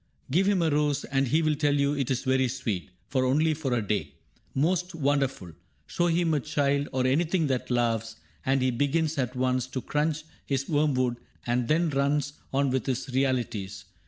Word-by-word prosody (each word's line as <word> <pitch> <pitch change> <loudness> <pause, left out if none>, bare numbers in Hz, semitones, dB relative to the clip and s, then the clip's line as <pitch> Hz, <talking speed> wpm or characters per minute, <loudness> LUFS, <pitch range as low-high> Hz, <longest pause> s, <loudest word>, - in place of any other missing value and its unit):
Give 185 +7 +3
him 195 -4 +3
a 160 - +2
rose, 145 -1 +1
And 135 0 0
he 155 +6 +2
will 155 -1 +2
tell 145 -1 +1
you 140 0 +2
it 140 -4 -1
is 130 -2 0
very 130 -1 +2
sweet, 110 -8 -3 0.2
But 130 -1 +2
only 155 +5 +3
for 145 -3 -3
a 120 -3 +1
day. 80 -9 -2 0.4
Most 180 +5 +1
wonderful! 135 - 0 0.3
Show 175 - 0
him 170 -1 +2
a 150 - +2
child, 140 +1 0
or 130 -1 0
anything 160 +5 +2
that 125 - -3
laughs. 115 -2 0 0.3
And 135 0 +2
he 130 - +2
begins 145 +4 0
at 125 0 -1
once 130 0 0
to 130 0 -4
crunch 150 +1 -1 0.2
his 135 -1 -2
worm 150 -2 +2
wood 125 -2 +1 0.3
And 120 0 0
then 165 +3 +2
runs 140 0 +1 0.2
on 140 0 +1
with 130 +1 -1
his 130 +1 -2
" - - -8
realities." 120 -8 -1
135 Hz, 195 wpm, -27 LUFS, 125-150 Hz, 0.4 s, Give